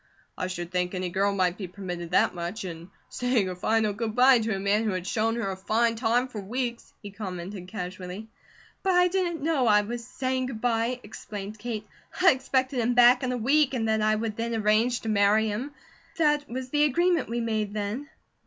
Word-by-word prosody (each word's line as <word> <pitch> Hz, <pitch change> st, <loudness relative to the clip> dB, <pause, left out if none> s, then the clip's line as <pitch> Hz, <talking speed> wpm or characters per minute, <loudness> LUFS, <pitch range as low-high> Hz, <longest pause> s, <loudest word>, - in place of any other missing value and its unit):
"I 185 Hz, -, -3 dB
should 175 Hz, -1 st, -5 dB
thing 180 Hz, -1 st, 0 dB
any 185 Hz, 0 st, -2 dB
girl 195 Hz, +3 st, +1 dB
might 185 Hz, -2 st, 0 dB
be 190 Hz, -, -4 dB
permitted 180 Hz, -2 st, -6 dB
that 180 Hz, -, +3 dB
much, 175 Hz, +5 st, -5 dB
in 170 Hz, 0 st, -8 dB, 0.2 s
saying 245 Hz, -5 st, 0 dB
a 180 Hz, -, -4 dB
final 215 Hz, +3 st, +1 dB
good 220 Hz, +1 st, -3 dB
bye 255 Hz, 0 st, +6 dB
to 220 Hz, -2 st, -1 dB
a -, -, -3 dB
man 200 Hz, +3 st, +1 dB
who 215 Hz, -3 st, 0 dB
had 185 Hz, -1 st, -3 dB
shown 225 Hz, +3 st, 0 dB
her 230 Hz, -5 st, -2 dB
a -, -, -4 dB
fine 230 Hz, +5 st, +1 dB
time 240 Hz, +2 st, +1 dB
for 225 Hz, -5 st, -7 dB
weeks," 235 Hz, +3 st, -4 dB
he 205 Hz, -, -7 dB
commented 185 Hz, -2 st, -6 dB
casually. 185 Hz, +1 st, -6 dB, 0.5 s
"But 380 Hz, -2 st, +1 dB
I 360 Hz, 0 st, +5 dB
didn't 350 Hz, -5 st, -1 dB
know 300 Hz, -6 st, +2 dB
I 210 Hz, -1 st, +5 dB
was 235 Hz, +3 st, -5 dB
saying 255 Hz, +1 st, -2 dB
good 240 Hz, -4 st, -6 dB
bye," 235 Hz, +1 st, 0 dB
explained 210 Hz, 0 st, -8 dB
Kate. 220 Hz, -2 st, -4 dB, 0.3 s
"I 370 Hz, 0 st, +7 dB
expected 260 Hz, -1 st, 0 dB
him 240 Hz, +1 st, +1 dB
back 245 Hz, +1 st, +7 dB
in 255 Hz, -1 st, -1 dB
a 250 Hz, -, -1 dB
week, 275 Hz, +3 st, +2 dB
and 225 Hz, -3 st, -1 dB
that 220 Hz, 0 st, +2 dB
I 215 Hz, 0 st, +3 dB
would 215 Hz, -1 st, -3 dB
then 230 Hz, 0 st, -2 dB
arrange 220 Hz, +3 st, +2 dB
to 225 Hz, -, -4 dB
marry 210 Hz, +1 st, +3 dB
him. 225 Hz, +7 st, -3 dB, 0.5 s
That 295 Hz, -2 st, +2 dB
was 255 Hz, +1 st, -5 dB
the 295 Hz, 0 st, +4 dB
agreement 340 Hz, 0 st, +2 dB
we 235 Hz, +1 st, -1 dB
made 220 Hz, -3 st, -1 dB
then." 215 Hz, +7 st, -3 dB
225 Hz, 210 wpm, -27 LUFS, 200-250 Hz, 0.5 s, I